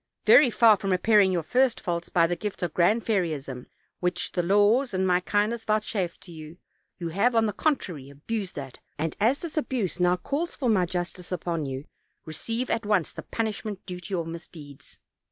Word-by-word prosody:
Very 280 -4 +7
far 225 -2 +5
from 195 - -4
repairing 200 +1 +4
your 175 -3 0
first 250 +7 +2
faults 170 -1 -3
by 170 -1 +4
the 175 +1 0
gift 205 -1 -5
of 170 -3 -2
Grand 210 +6 +2
Fairyism, 155 - -2 0.3
which 180 0 -1
the 180 - 0
laws 205 +6 +3
and 190 0 +1
my 180 -1 +3
kindness 210 +5 0
vouchsafed 215 -4 -1
to 175 - -13
you, 160 0 -10 0.4
you 170 -2 -4
have, 205 +8 +1
on 225 -1 +4
the 210 - -1
contrary, 180 - -1
abused 185 +8 -5
that, 135 -3 -7 0.2
and 160 +1 -2
as 235 +7 +3
this 325 -1 -7
abuse 230 - -1
now 180 0 +4
calls 300 - -3
for 255 -4 -1
my 185 -5 +3
justice 180 +1 -5
upon 165 -4 -2
you, 135 +1 -5 0.4
receive 230 +10 -3
at 230 - 0
once 205 -5 +1
the - - -7
punishment 215 -3 -4
due 180 -1 -6
to 180 - -9
your 175 -4 -1
mis 165 +1 -7
deeds. 145 -3 -13
185 Hz, 195 wpm, -26 LUFS, 170-220 Hz, 0.4 s, Very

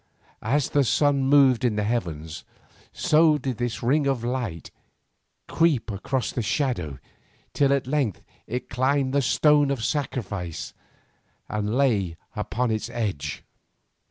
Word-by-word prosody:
As 135 +5 0
the 145 - +3
sun 140 +1 +2
moved 135 -3 +5
in 120 -4 +2
the 105 - 0
heavens, 85 -9 -3 0.5
so 155 0 +4
did 130 -5 -4
this 120 -1 -3
ring 140 +4 +2
of 135 -4 0
light 120 -9 -3 0.8
creep 150 -9 +1
across 105 +2 -2
the 120 - -2
shadow 105 - -1 0.6
till 140 -1 +3
at 140 -2 +1
length 130 - -1 0.2
it 125 +2 -4
climbed 130 +2 0
the 140 - +3
stone 145 +2 +4
of 135 -5 -2
sacrifice 105 - -3 0.8
and 105 +1 -2
lay 100 -12 +1 0.2
upon 125 0 -1
its 110 -1 -2
edge. 95 - -3
125 Hz, 130 wpm, -25 LUFS, 105-140 Hz, 0.8 s, moved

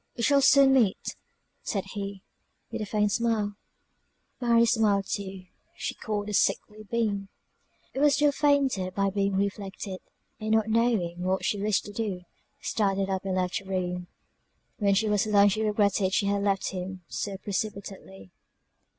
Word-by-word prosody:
"We 235 - -2
shall 280 +3 +4
soon 275 0 +6
meet," 225 -8 +1 0.5
said 195 -3 -2
he, 200 -2 -5 0.5
with - - -4
a 210 - -3
faint 210 0 +1
smile; 220 -2 0 0.9
Mary 235 -2 +4
smiled 215 -4 +2
too; 195 -1 -5 0.3
she - - -3
caught 210 -2 -3
the 210 - -5
sickly 210 +1 +1
beam; 205 -4 -1 0.6
it - - -3
was 290 -1 +5
still 295 0 +4
fainter 280 -10 +2
by 195 +1 0
being 195 0 0
reflected, 195 -1 -3 0.4
and 215 0 -4
not 220 0 +2
knowing 220 -7 +1
what 185 +1 0
she 205 - 0
wished 210 -1 +1
to 205 - -7
do, 205 -4 -3 0.4
started 195 -2 0
up 190 +1 -2
and 190 -1 -1
left 180 -1 0
the 195 - -16
room. 180 -1 -2 0.7
When 200 -2 +2
she 220 +2 +2
was 210 0 +1
alone 205 -1 +5
she 215 +2 -1
regretted 205 -2 +2
she 200 - +2
had 200 0 +1
left 195 -1 0
him 185 0 -6
so 200 -2 -4
precipitately. 195 - -5
200 Hz, 160 wpm, -27 LUFS, 195-220 Hz, 0.9 s, soon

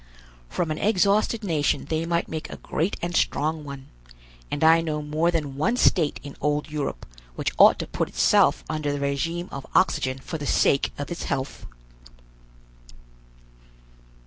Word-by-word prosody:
From 165 -3 -2
an 155 - -3
exhausted 210 +2 +2
nation 155 -7 0
they 160 +2 -2
might 170 0 0
make 160 -1 -5
a - - -8
great 165 +6 -2
and 175 0 -2
strong 155 0 0
one, 140 -2 -9 0.6
and 145 - -2
I 165 +1 +6
know 155 -2 -3
more 155 +3 +1
than 150 -5 -2
one 230 +12 +1
state 165 -10 +3
in 140 -1 -9
old 150 +1 -1
Europe 145 - -3 0.3
which - - -2
ought - - +8
to - - -4
put - - -3
itself - - +3
under 155 -2 -2
the 145 - -2
regime 165 +5 -2
of 140 - -6
oxygen 130 -8 +2
for 155 +4 -6
the 145 - -4
sake 135 - +2
of 145 +4 -5
its 170 - -4
health!" 135 0 -4
155 Hz, 160 wpm, -25 LUFS, 145-170 Hz, 0.6 s, ought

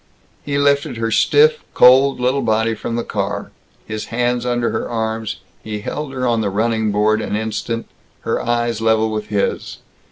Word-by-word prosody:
He 140 -1 -2
lifted 140 -3 +1
her 115 0 -1
stiff, 460 - +4 0.2
cold 130 +2 +6
little 130 +3 +1
body 110 +1 +1
from 115 +2 -4
the 120 - -1
car. - - -3 0.3
His 110 -1 -5
hands 120 +1 -1
under 120 -1 0
her - - -3
arms, 110 -1 -2 0.3
he 105 -1 -5
held 150 +6 -4
her 130 -1 -3
on 115 -2 +1
the 105 - 0
running 110 +1 0
board 105 +1 +2
an - - -3
instant, 110 +1 -3 0.4
her - - -1
eyes 120 -1 -1
level 110 0 +2
with 105 -1 -3
his. 105 -2 -2
115 Hz, 170 wpm, -19 LUFS, 110-125 Hz, 0.4 s, cold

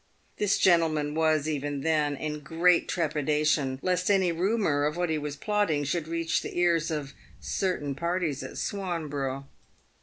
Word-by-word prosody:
This 205 -2 +2
gentleman 160 -5 +3
was, 155 -1 +2
even 145 -2 -2
then, 150 -2 +1
in 150 +1 -4
great 165 +4 +2
trepidation 150 -4 0
lest 180 0 +1
any 190 -3 +3
rumour 175 -4 +1
of 150 +3 -1
what 175 -2 0
he 155 - 0
was 145 -1 -4
plotting 205 -5 0
should 155 +2 -2
reach 165 0 0
the - - -7
ears 170 -2 +2
of 145 -4 -4 0.3
certain 175 -7 -2
parties 170 -1 -1
at - - -8
Swanborough. 145 -8 -3
155 Hz, 150 wpm, -28 LUFS, 145-175 Hz, 0.3 s, gentleman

